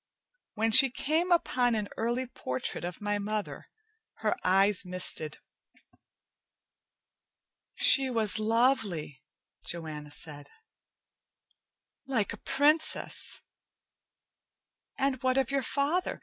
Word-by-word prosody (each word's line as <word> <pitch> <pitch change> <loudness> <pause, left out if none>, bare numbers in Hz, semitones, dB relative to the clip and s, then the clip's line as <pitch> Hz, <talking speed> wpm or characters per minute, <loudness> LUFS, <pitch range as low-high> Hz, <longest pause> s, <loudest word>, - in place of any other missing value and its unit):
When 225 +1 +1
she 270 +4 +8
came 315 +8 -1
upon 250 -8 +2
an 210 -2 -2
early 240 +3 -1
portrait 130 - -4
of 175 +2 -6
my 205 0 -1
mother, 210 0 -4 0.5
her 215 -1 -1
eyes 195 +2 +3
misted. 180 -4 -1 2.4
"She 270 -1 +6
was 225 -3 0
lovely," 215 - 0 0.4
Joanna 155 -3 -4
said. 145 -1 -8 1.6
"Like 230 -8 -1
a - - -8
princess! 295 +7 0 1.5
And 270 -2 -1
what 255 0 +1
of 270 0 +1
your 275 0 +1
father? 290 +7 -1
225 Hz, 95 wpm, -29 LUFS, 185-270 Hz, 2.4 s, she